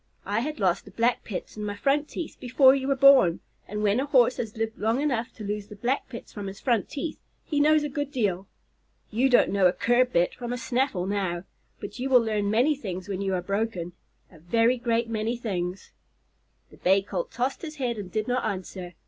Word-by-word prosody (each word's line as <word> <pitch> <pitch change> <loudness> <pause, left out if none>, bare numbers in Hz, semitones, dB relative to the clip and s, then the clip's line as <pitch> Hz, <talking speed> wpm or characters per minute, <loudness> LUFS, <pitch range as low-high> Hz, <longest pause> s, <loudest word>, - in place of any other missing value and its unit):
I 205 +3 0
had 300 +6 -4
lost 185 -4 +1
the - - -12
black 235 +1 0
pits 195 - -6
in 210 - -4
my 205 -1 -3
front 285 +7 +1
teeth 335 - -6
before 260 +1 +5
you 270 -1 -1
were 275 - +2
born, 265 -11 +6 0.3
and 210 +1 -4
when 210 +3 +3
a 275 - -1
Horse 255 -3 +4
has 220 -2 -5
lived 225 0 -3
long 225 +4 +1
enough 260 -5 -1
to 220 - -10
lose 205 0 -4
the 210 - -10
black 245 +7 -1
pits 235 -3 -9
from 205 -2 -6
his 195 0 -8
front 235 -6 0
teeth, 300 +2 -5 0.3
he 295 - -1
knows 305 +1 +4
a - - -1
good 290 0 -4
deal. 200 -8 -1 0.6
You 245 +5 +2
don't 245 - +4
know 195 -2 +4
a - - +3
curb 245 +5 +2
bit 170 +1 +2
from 240 -1 -6
a - - -3
snaffle 245 -5 -1
now, 190 -3 -2 0.4
but 210 - -8
you 265 +2 -2
will 255 -2 +7
learn 210 -2 0
many 250 +8 +3
things 190 -8 -6
when 195 -1 -3
you 195 -1 0
are 180 - -2
broken 195 -3 -2 0.4
a 165 - -16
very 230 +9 +2
great 235 -1 0
many 225 +1 -2
things." 185 -5 -4 0.8
The - - -16
Bay 195 +2 +3
Colt - - -4
tossed 255 +3 -2
his 310 -2 -7
head 245 -6 -2
and 190 -3 -7
did 215 -1 -2
not 250 +1 0
answer. 185 -3 -5
225 Hz, 225 wpm, -26 LUFS, 200-260 Hz, 0.8 s, will